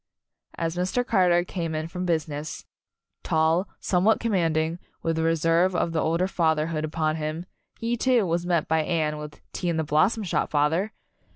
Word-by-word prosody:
As 165 0 -2
Mr. 185 +8 0
Carter 175 -6 +3
came 170 -3 -4
in 155 0 -2
from 180 +2 -4
business 155 -2 -2 0.6
tall, 160 +4 +2
somewhat 190 +4 +2
commanding, 165 -6 0 0.2
with 165 0 0
the 160 - +1
re 165 0 +3
serve 165 +3 +2
of 170 - +1
the 160 -1 0
older 170 +3 +1
fatherhood 160 -3 0
upon 155 0 -1
him 155 +2 -4 0.3
he, 230 +1 -1
too, 240 -2 +2
was 170 0 0
met 175 -3 0
by 160 0 +2
Anne 155 -2 -1
with 150 0 -9
"Tea 175 - -2
in 165 - 0
The 160 - +1
Blossom 155 +9 +2
Shop, 185 - -1
father!" 160 +8 +1
165 Hz, 175 wpm, -25 LUFS, 155-180 Hz, 0.6 s, Carter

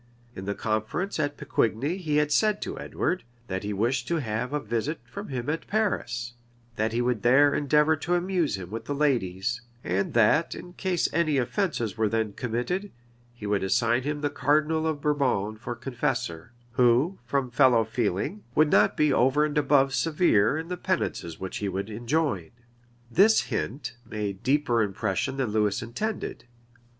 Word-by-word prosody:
In 95 - -7
the 100 0 -2
conference 110 - -2
at 145 -1 -1
Pecquigni 140 - 0
he 155 -6 -1
had 150 0 +2
said 215 +5 +3
to - - -5
Edward, 180 - -2 0.2
that 95 -4 -3
he 105 - -4
wished 120 +5 0
to 170 - 0
have 125 -3 -2
a 150 - 0
visit 120 +6 -2
from 200 +1 -8
him 125 -3 -4
at 155 +2 -2
Paris; 120 - -1 0.4
that 110 +1 0
he 120 +2 0
would 120 -3 0
there 140 +5 +5
endeavor 150 +2 +3
to 175 +4 0
amuse 175 - 0
him 90 -1 -8
with 115 +1 -5
the 145 - -3
ladies; 120 -6 0 0.2
and 95 +5 -1
that, 120 +8 +4
in 175 - -10
case 185 -2 0
any 155 -3 +2
offences 125 - -1
were 110 -1 +2
then 110 -2 -1
committed, 125 - -2 0.4
he 120 -3 -10
would 100 -1 0
assign 115 +5 +2
him 145 +2 -3
the 145 -1 0
cardinal 155 +2 +1
of 155 -3 -2
Bourbon 130 -9 +1
for 120 +2 -6
confessor, 120 - -3 0.2
who, 125 +9 +3
from 130 0 -1
fellow 120 -2 +5
feeling, 110 - -2
would 155 0 +4
not 105 +1 +4
be 150 -1 +3
over 135 +5 +3
and 150 0 -3
above 140 -2 +3
severe 150 - +3
in 160 +1 -4
the 180 0 -4
penances 125 - -2
which 95 0 -5
he 100 - -2
would 95 +3 -4
enjoin. 120 - -1 0.6
This 215 - +5
hint 125 +1 -4
made 100 -3 -4
deeper 135 -4 +2
impression 105 +4 -1
than 130 -5 -1
Lewis 105 0 +1
intended. 170 - -4
125 Hz, 170 wpm, -27 LUFS, 110-150 Hz, 0.6 s, there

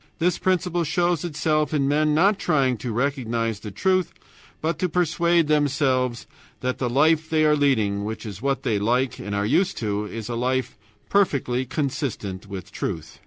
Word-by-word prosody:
This 175 0 +1
principle 180 -2 +1
shows 175 0 +1
itself 155 -2 0
in 140 -2 +1
men 150 +1 +2
not 195 +5 +3
trying 135 -7 +2
to 115 +3 -4
recognize 115 -3 -1
the 105 - -7
truth, 185 - +1 0.5
but 160 +2 -2
to 185 - 0
persuade 170 -1 +2
themselves 135 -5 +1 0.4
that 125 0 -2
the 125 - 0
life 155 +5 +3
they 155 -1 +3
are 150 0 +4
leading, 110 -9 +1
which 110 +2 -5
is 100 -1 -7
what 135 0 -1
they 105 -3 +1
like 125 +5 0
and 100 0 -4
are 100 0 0
used 185 - +1
to, 105 -2 -2
is 110 0 -6
a 120 - -3
life 125 +1 -1 0.3
perfectly 130 -10 +1
consistent 125 - -3
with 95 -2 -8
truth. - - -5
140 Hz, 170 wpm, -24 LUFS, 115-160 Hz, 0.5 s, are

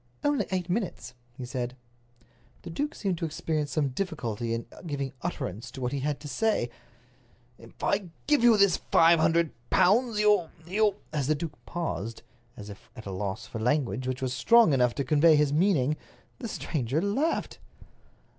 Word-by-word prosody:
"Only 290 -1 +1
eight 185 -2 -2
minutes," 180 - -3 0.2
he 130 - -5
said. 125 0 -4 0.9
The 170 - -7
duke 290 - -2
seemed 190 -5 -2
to - - -1
experience 155 -1 -2
some 145 -3 +1
difficulty 125 - -3
in 115 0 -2 0.2
giving 140 -2 -3
utterance 130 - -4
to 135 - -10
what 125 -1 -2
he 140 - -2
had 145 +1 -2
to 150 - -7
say. 210 - 0 0.9
"If 115 0 -15
I 200 -3 0 0.2
give 295 -5 +3
you 235 -2 +7
this 200 -3 +4
five 165 0 +6
hundred 165 0 +3 0.2
pounds, 210 +5 +3
you—you—" 205 0 +2 0.2
As 145 -4 -1
the 155 - +3
duke 150 0 -6
paused, 115 - -4 0.3
as 105 - -9
if 100 0 -12
at 110 - -10
a 100 - -5
loss 100 +3 -4
for 115 - -7
language 130 +1 0
which 130 0 -3
was 130 -1 -1
strong 215 - +5
enough 125 -3 +2
to 140 - -1
convey 155 +4 +5
his 145 -1 +2
meaning, 155 -4 +2 0.4
the 235 - -4
stranger 145 - -2
laughed. 240 - -1
155 Hz, 170 wpm, -28 LUFS, 125-190 Hz, 0.9 s, you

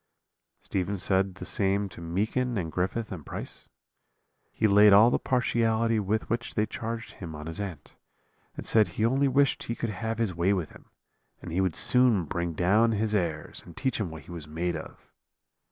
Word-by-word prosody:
"Stephen 95 +1 -2
said 95 0 +1
the - - -8
same 100 0 +1
to 90 - -12
Meekin 110 +8 -1
and 85 -4 -3
Griffith 95 +6 -2
and 90 -6 -6
Price; - - -7 0.8
he 110 - -1
laid 105 0 +7
all 110 +4 +7
the - - +1
partiality 115 -3 +1
with 105 +2 -1
which 115 +1 -3
they 105 - +2
charged 115 +1 -5
him 80 -4 -8
on 75 0 -8
his 80 +2 -5
aunt, 95 -8 -7 0.6
and - - -6
said 110 -2 +4
he 110 - -1
only 135 +4 +2
wished 140 +1 +2
he 115 - -4
could 115 -2 -3
have 110 +3 -3
his 115 -5 0
way 90 +4 +2
with 90 -5 -3
him, - - -16 0.5
and - - -8
he 90 +3 +1
would 95 -4 0
soon 125 -8 +4
bring 85 +2 -3
down 105 +8 +3
his 110 0 -1
airs, 85 -6 -2
and 85 - -14
teach 130 -4 -1
him 100 -5 -2
what 80 -1 -9
he - - -13
was 80 -3 -7
made 85 +3 -2
of. 80 - -9
100 Hz, 195 wpm, -27 LUFS, 85-115 Hz, 0.8 s, laid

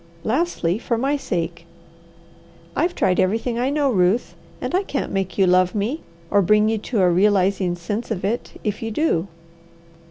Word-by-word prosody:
Lastly, 225 - 0
for 235 -1 -1
my 275 +5 +1
sake. 170 - -3 1.1
I've 345 +3 0
tried 180 - +2
everything 225 +5 0
I 255 +2 +1
know, 285 -1 +1
Ruth, 190 +3 +2 0.3
and - - -4
I 370 - +3
can't 295 -8 -3
make 195 -1 -2
you 195 - +5
love 180 +1 +3
me, 225 +10 -1 0.3
or 205 - +5
bring 210 +3 +4
you 220 -1 0
to 215 -1 -1
a 180 - +5
realizing 190 -1 +2
sense 205 +7 -4
of 195 -4 -2
it 225 +4 -3
if 210 -2 -2
you 225 - -3
do. 215 - 0
210 Hz, 170 wpm, -22 LUFS, 185-245 Hz, 1.1 s, you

